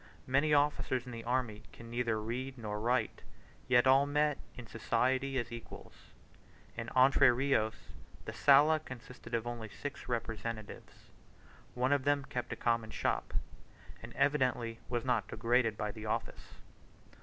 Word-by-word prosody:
Many 140 +4 +2
officers 145 -3 +2
in 125 - -8
the 115 -1 -7
army 120 -4 -1
can 115 0 -12
neither 120 -2 0
read 125 +5 -4
nor 105 -2 -4
write, 120 0 0 0.5
yet 125 0 +5
all 135 +2 +5
meet 150 0 +1 0.2
in 125 - -9
society 130 +4 0
as 120 -2 -2
equals. 115 -1 -9 0.8
In 115 0 -5
Entre 130 0 +6
Rios, 120 -3 +1 0.5
the - - -5
Sala 150 +3 +5
consisted 125 -4 -8
of 115 0 -2
only 120 -2 -5
six 145 +5 -7
representatives. 115 -2 -5 0.6
One 130 +3 +2
of 140 -2 +1
them 145 -1 +1
kept 125 - -4
a - - -2
common 115 -2 0
shop, - - -1 0.7
and - - -9
evidently 125 -5 +1
was 120 0 -2
not 120 -4 +1
degraded 115 -1 +1
by 105 -1 -2
the 110 0 -8
office. 110 - -4
125 Hz, 145 wpm, -33 LUFS, 115-135 Hz, 0.8 s, Entre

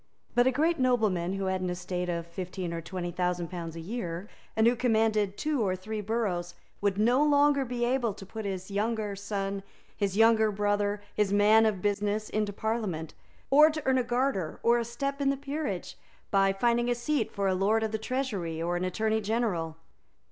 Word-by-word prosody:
But 245 +1 +4
a - - +4
great 315 +5 +1
nobleman, 215 -9 +2
who 195 0 -2
had 190 0 -1
an 185 - -1
estate 180 0 -3
of 170 -1 -2
fifteen 180 0 -5
or 165 - -3
twenty 175 +1 -4
thousand 180 -1 -1
pounds 170 -2 -6
a - - -6
year, 180 -1 -4 0.3
and 220 - +3
who 240 +1 +5
commanded 220 -4 +1
two 300 -4 0
or 190 -3 +1
three 210 +3 -5
boroughs, 195 -5 -2 0.3
would 200 -1 +1
no 240 +7 +4
longer 290 -1 +4
be 240 -1 -1
able 240 -4 0
to 195 - -10
put 220 +3 -7
his 190 -1 -4
younger 210 0 -1
son, 200 -1 -3 0.3
his 200 -1 -1
younger 225 -1 +5
brother, 205 0 0
his 210 -2 +1
man 215 +2 +5
of 200 -4 -2
business, 205 +1 0
into 210 -1 0
Parliament, 200 -7 -3 0.4
or 300 +3 +8
to 310 -1 -4
earn 260 -1 +3
a - - +1
garter 240 - -1
or 235 +1 +4
a 235 - -2
step 275 +4 -3
in 275 - +3
the 275 - +1
peerage 280 - -4 0.4
by 195 -1 +4
finding 240 +4 +1
a 245 - +2
seat 240 0 -1
for 200 -1 -1
a 190 - +2
Lord 205 +4 +2
of 220 - -1
the 220 - -2
Treasury 215 -10 -2
or 170 +1 -1
an 175 - -1
Attorney 220 +4 0
General. 200 -7 -1
210 Hz, 200 wpm, -29 LUFS, 185-240 Hz, 0.4 s, or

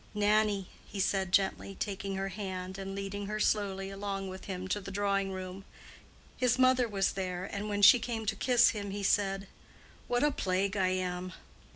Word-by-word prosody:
"Nannie!" 210 -2 +2 0.2
he 205 - -7
said 190 -1 +1
gently, 195 0 +1
taking 195 -1 -3
her 195 0 -2
hand 190 -1 -5
and 195 0 -5
leading 200 0 -4
her 215 +1 -3
slowly 195 -2 0
along 195 -1 -4
with 185 0 -8
him 185 -1 -4
to 205 - 0
the 195 - -8
drawing 195 0 0
room. 185 0 -6 0.7
His 250 -1 +2
mother 255 -1 +4
was 195 -3 +1
there, 185 -1 -3
and 205 +2 -4
when 205 0 -1
she 205 +5 +9
came 225 -1 -3
to 215 0 0
kiss 245 -2 +5
him, 205 -2 -4
he 200 +1 -4
said: 195 0 +1 0.6
"What 245 +2 +1
a 295 - +4
plague 190 -3 0
I 190 -2 +2
am!" 185 -1 -2
195 Hz, 185 wpm, -31 LUFS, 190-210 Hz, 0.7 s, she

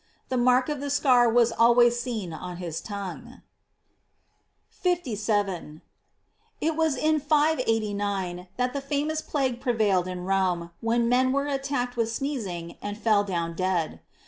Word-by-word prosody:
The 260 - -1
mark 250 +1 +4
of 295 -2 -2
the 285 +1 -4
scar 255 -4 +4
was 235 0 +4
always 240 +1 +4
seen 220 -9 -4
on 180 +2 -7
his 170 -3 -5
tongue.* 205 +5 -7 1.3
57. 210 - -1 0.4
— - - -42
It 320 0 0
was 320 -3 +1
in 310 +1 +2
589 205 - 0
that 250 0 0
the 280 - -3
famous 295 +3 -1
plague 260 -6 -2
pre 245 -3 +1
vailed 200 -5 +2
in 180 -1 -5
Rome, 185 -3 0
when 230 +1 +1
men 255 +2 +3
were 280 +1 0
attacked 270 -3 -2
with 230 -1 +1
8neezing, 220 - -4
andfell 205 0 +1
down 170 -3 -2
dead. 180 -2 -1
235 Hz, 145 wpm, -26 LUFS, 190-270 Hz, 1.3 s, mark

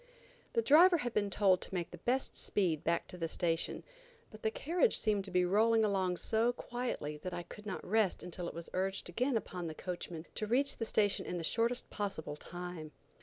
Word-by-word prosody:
The 460 - +2
driver 345 +5 +7
had 245 -6 -3
been 205 -1 +1
told 190 -2 +3
to - - -6
make 175 -2 -2
the 175 - -9
best 255 +8 0
speed 170 -7 0
back 170 0 0
to 180 - -9
the 165 - -1
station, 165 0 -1 0.5
but 215 - -12
the 220 - +2
carriage 345 - +2
seemed 210 -2 +1
to - - -4
be 180 -1 +3
rolling 220 +4 +4
along 190 -3 +1
so 225 +5 +2
quietly 240 -13 -4
that 180 +3 -5
I 175 - -4
could 210 +4 -11
not 195 - -4
rest 210 -1 +2
until 175 0 -5
it - - -6
was 170 0 -6
urged 190 0 -1
again 245 +7 +1
upon 180 -5 -5
the 160 - -6
coachman 175 -2 -5
to 215 - -3
reach 265 +5 +2
the 225 - -2
station 205 -2 +1
in 180 - -2
the 170 - -4
shortest 230 +8 0
possible 195 -8 -3
time. 175 -1 -7
195 Hz, 210 wpm, -34 LUFS, 175-225 Hz, 0.5 s, driver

